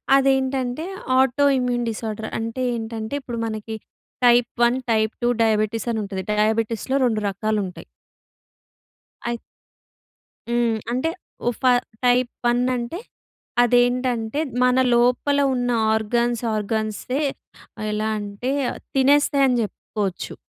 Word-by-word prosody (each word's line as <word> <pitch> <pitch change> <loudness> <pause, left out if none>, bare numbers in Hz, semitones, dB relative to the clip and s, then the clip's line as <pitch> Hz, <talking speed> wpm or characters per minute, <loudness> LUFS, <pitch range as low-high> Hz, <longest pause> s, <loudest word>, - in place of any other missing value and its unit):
అదేంటంటే, 265 +1 +1 0.3
auto 265 +2 +3
immune 245 -1 0
disorder. 220 0 -4
అంటే 230 +3 -3
ఏంటంటే, 225 0 -5
ఇప్పుడు 240 -3 -5
మనకి 220 0 -4 0.5
టైప్ 240 0 +5
వన్, 240 +2 +4
టైప్ 220 -1 +2
టూ 240 - +3
డయాబెటిసనుంటది. 215 -2 0
డయాబెటిస్‌లో 220 +4 0
2 220 -3 +1
రకాలుంటాయి. 200 -2 -2 1.4
అయి 240 0 -1 1.1
హ్మ్. 235 -1 +2 0.2
అంటే 260 +7 0 0.4
ఒ - - +5
ఫ - - -25 0.4
టైప్ 245 0 +3 0.2
వన్ 240 0 +2
అంటే, 245 +9 -4 0.6
అదేంటంటే, 245 0 +2 0.2
మన 250 0 +4 0.2
లోపల 250 +4 +2 0.2
ఉన్న 245 -1 -1 0.2
ఆర్గన్స్ 235 +2 0
ఆర్గన్సే, 215 +6 -2 0.6
ఆహ్, 215 - -3
ఎలా 215 +1 -1
అంటే, 205 +5 -4 0.2
ఆహ్, - - -8 0.2
తినేస్తాయని 275 -1 +4
చెప్పుకోవచ్చు. 200 -3 -4
235 Hz, 105 wpm, -22 LUFS, 220-250 Hz, 1.4 s, టైప్